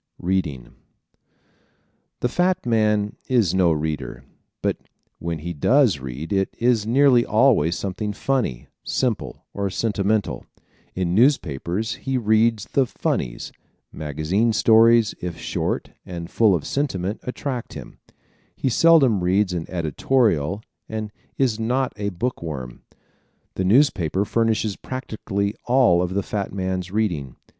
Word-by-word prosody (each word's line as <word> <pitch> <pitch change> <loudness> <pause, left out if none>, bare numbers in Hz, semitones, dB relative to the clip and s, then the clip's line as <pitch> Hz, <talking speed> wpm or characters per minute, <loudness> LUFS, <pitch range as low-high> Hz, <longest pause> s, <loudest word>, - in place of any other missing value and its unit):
Reading 85 -8 -1
¶ - - -20 1.5
The - - +2
fat 180 +5 0
man 105 -3 +1
is 115 -9 +2
no 90 -3 +3
reader 75 -1 -3 0.4
but - - 0 0.4
when 85 0 -3
he 85 +3 -5
does 110 - +3
read 65 +7 -6
it 95 -1 +1
is 115 -3 +2
nearly 130 0 +5
always 110 - +3
something 100 +2 -3
funny, 105 - -2 0.2
simple 120 -6 -2
or 100 -1 -2
sentimental. 105 +1 -1 0.5
In 90 -2 -1
newspapers 105 - +1
he 135 -1 -1
reads 110 -1 +2
the 135 -2 +1
"funnies." - - -3 0.4
Magazine 80 +10 -1
stories, 115 0 +5
if 90 -2 -4
short - - -3
and 85 -1 -7
full 110 -5 +4
of 80 - -3
sentiment, 105 -8 -2
attract 125 -1 -5
him. - - -10 0.6
He 135 - -1
seldom 135 - +4
reads 95 +1 +2
an 85 -2 -3
editorial 90 - 0 0.3
and 110 -1 -4 0.3
is 120 -5 +1
not 125 +4 0
a 100 -1 -2
book 110 +7 -3
worm. 65 -7 -6 0.7
The 95 - -2
newspaper 100 - +3
furnishes 110 -2 0
practically 105 -5 -3
all 120 -9 +4
of 90 +1 -2
the 100 - 0
fat 100 -1 -3
man's 95 -1 -3
reading. 90 - -2
105 Hz, 130 wpm, -22 LUFS, 85-115 Hz, 1.5 s, nearly